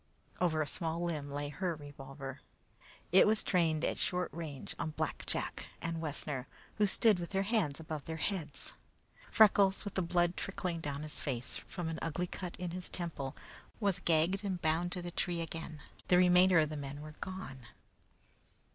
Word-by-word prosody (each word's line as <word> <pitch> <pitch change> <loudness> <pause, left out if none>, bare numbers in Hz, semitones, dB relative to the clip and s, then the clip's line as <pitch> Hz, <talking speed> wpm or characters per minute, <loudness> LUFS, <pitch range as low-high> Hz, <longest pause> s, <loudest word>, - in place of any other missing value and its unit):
Over 160 -3 +2
a - - -6
small 165 +3 -1
limb 155 -5 -2
lay 145 +1 -3
her 175 +2 -1
revolver. 135 -2 -8 0.7
It 190 +3 +8
was 215 0 +5
trained 165 -4 +2
at - - -1
short 180 0 0
range 155 -5 -5
on 155 -2 -3
Black - - -2
Jack - - -2
and 165 -1 -2
Wessner, 145 -4 -2 0.3
who 210 -1 +4
stood 210 -1 +4
with 170 - -4
their 195 0 +1
hands 195 -9 +1
above 155 -3 -5
their 160 0 -4
heads. 175 -1 -3 0.6
Freckles, 200 -2 +5
with 205 - -4
the 190 - +1
blood 175 0 +2
trickling 185 -4 -2
down 145 -2 -3
his 155 - -4
face, 125 -4 -3
from 175 -3 -4
an 160 0 -3
ugly 165 +2 -1
cut 180 0 -5
in 180 -1 -4
his 180 +1 -4
temple, 155 -6 -4 0.4
was 200 -5 +1
gagged 170 +5 +3
and 190 -3 -1
bound 170 +1 +1
to 180 - -3
the 175 - -3
tree 175 -1 -1
again; 165 -1 -5 0.3
the 180 - +6
remainder 180 0 +6
of 155 -2 +4
the 155 - -4
men 140 0 -5
were 155 0 -8
gone. 135 -10 -6
170 Hz, 180 wpm, -34 LUFS, 150-180 Hz, 0.7 s, It